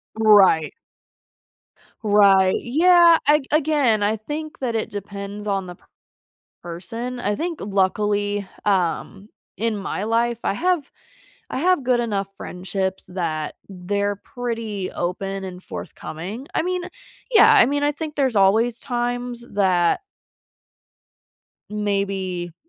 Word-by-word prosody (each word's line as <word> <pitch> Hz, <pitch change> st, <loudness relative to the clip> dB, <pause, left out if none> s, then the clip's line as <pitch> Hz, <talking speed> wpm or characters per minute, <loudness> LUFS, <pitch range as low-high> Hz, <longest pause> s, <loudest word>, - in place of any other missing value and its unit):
Right. 205 Hz, -8 st, +5 dB, 1.3 s
Right. 200 Hz, -3 st, +5 dB
Yeah, 340 Hz, +5 st, +6 dB
a 300 Hz, +1 st, +5 dB
again, 290 Hz, -8 st, +2 dB
I 215 Hz, +2 st, +1 dB
think 300 Hz, +8 st, -6 dB
that 245 Hz, -3 st, -2 dB
it 220 Hz, -, -2 dB
depends 200 Hz, +1 st, -7 dB
on 195 Hz, -2 st, -1 dB
the 180 Hz, -1 st, -9 dB
p -, -, -30 dB, 0.8 s
person. 225 Hz, +9 st, -6 dB
I 205 Hz, -2 st, 0 dB
think, 335 Hz, +5 st, -4 dB
luckily, 205 Hz, +1 st, 0 dB, 0.2 s
um, 195 Hz, +1 st, -1 dB, 0.3 s
in 225 Hz, +2 st, -1 dB
my 200 Hz, 0 st, -3 dB
life, 230 Hz, +1 st, +1 dB
I -, -, +1 dB
have 350 Hz, -, 0 dB, 0.6 s
I -, -, -3 dB
have 355 Hz, 0 st, +2 dB
good 245 Hz, -1 st, +2 dB
enough 200 Hz, -4 st, -2 dB
friendships 190 Hz, +1 st, -4 dB
that 165 Hz, -4 st, -3 dB
they're 200 Hz, +2 st, -2 dB
pretty 225 Hz, -4 st, -5 dB
open 195 Hz, +2 st, -3 dB
and 185 Hz, -1 st, -7 dB
forthcoming. 190 Hz, -, -7 dB
I -, -, +3 dB
mean, 360 Hz, 0 st, -2 dB, 0.5 s
yeah 445 Hz, -1 st, +7 dB
I 420 Hz, -, +7 dB
mean, 285 Hz, +1 st, 0 dB
I 290 Hz, -, +3 dB
think 310 Hz, 0 st, -6 dB
there's 265 Hz, -5 st, +1 dB
always 225 Hz, +5 st, +3 dB
times 245 Hz, -1 st, -3 dB
that 185 Hz, -4 st, +2 dB, 1.7 s
maybe 195 Hz, -4 st, -2 dB
210 Hz, 120 wpm, -22 LUFS, 195-250 Hz, 1.7 s, yeah